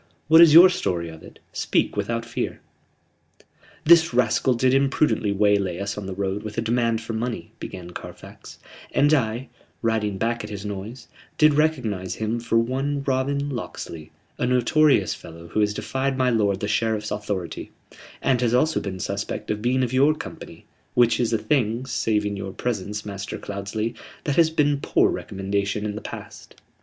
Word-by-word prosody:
"What 160 +1 +8
is 170 -2 +9
your 175 +3 +11
story 85 - -2
of 80 -1 -11
it? - - -14 0.2
Speak - - 0
without 115 +3 -2
fear." 115 - -4 1.2
"This 165 -4 +6
rascal 125 +1 +2
did 130 +2 +2
imprudently 135 -5 +2
waylay 100 -3 +2
us 100 +2 -3
on 105 -2 -6
the 95 - -5
road 100 +1 -2
with 105 0 -8
a - - +1
demand 115 -1 +1
for 115 0 -6
money," 110 -5 -4
began 90 -2 -8
Carfax, - - -11 0.4
"and 145 +2 +4
I, 120 -2 0 0.3
riding 110 -3 0
back 115 +2 -1
at 105 - -7
his 100 -1 -6
noise, 105 +4 -6 0.3
did 155 -1 +5
recognize 125 - 0
him 110 +2 -2
for 115 0 0
one 135 +4 0
Robin 140 +1 0
Locksley, 85 - -6 0.3
a 125 - +1
notorious 135 +4 +3
fellow 85 0 -11
who 105 - -1
has 105 -1 +3
defied 130 +5 -2
my 130 -1 +2
lord 100 -4 +1
the 105 - -1
Sheriff's 110 0 0
authority; 100 -4 -4 0.5
and 130 -3 +2
has 120 -1 +2
also 155 +5 +2
been 95 -2 -5
suspect 100 +3 -3
of 105 0 -3
being 130 +3 +1
of 125 0 -2
your 140 +4 +4
company - - -10 0.3
which 120 -1 +4
is 120 -2 +1
a 115 - +2
thing, 120 -2 0
saving 105 -5 0
your 95 -1 -6
presence, 105 -2 -3
Master 100 -1 -5
Cloudesley, 100 +3 -4 0.3
that 145 - -1
has 165 0 +5
been 145 -3 +1
poor - - +3
recommendation 100 +2 -2
in 105 - -2
the 105 - -6
past. - - -10
115 Hz, 170 wpm, -24 LUFS, 100-130 Hz, 1.2 s, your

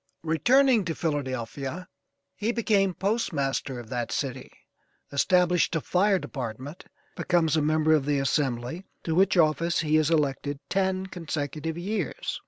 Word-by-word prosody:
Returning 240 - +4
to 165 -2 -2
Philadelphia 140 +2 -3 0.5
he 215 +2 -1
became 205 -5 +1
postmaster 145 - -1
of 115 -2 -10
that 120 -2 -3
city, 130 -2 -3 0.6
established 180 +4 +2
a 160 - 0
fire 195 +5 +2
department, 130 +1 -6 0.3
becomes 170 -4 +1
a 155 - +2
member 155 +1 +3
of 150 -3 +2
the 145 -1 +2
Assembly, 135 +3 -1 0.2
to 165 - -1
which 190 +2 +3
office 165 +1 +2
he 155 -1 +2
is 155 -1 +2
elected 145 -2 0
ten 190 -1 0
consecutive 160 -3 -4
years. 190 -2 -3
160 Hz, 135 wpm, -26 LUFS, 140-185 Hz, 0.6 s, Returning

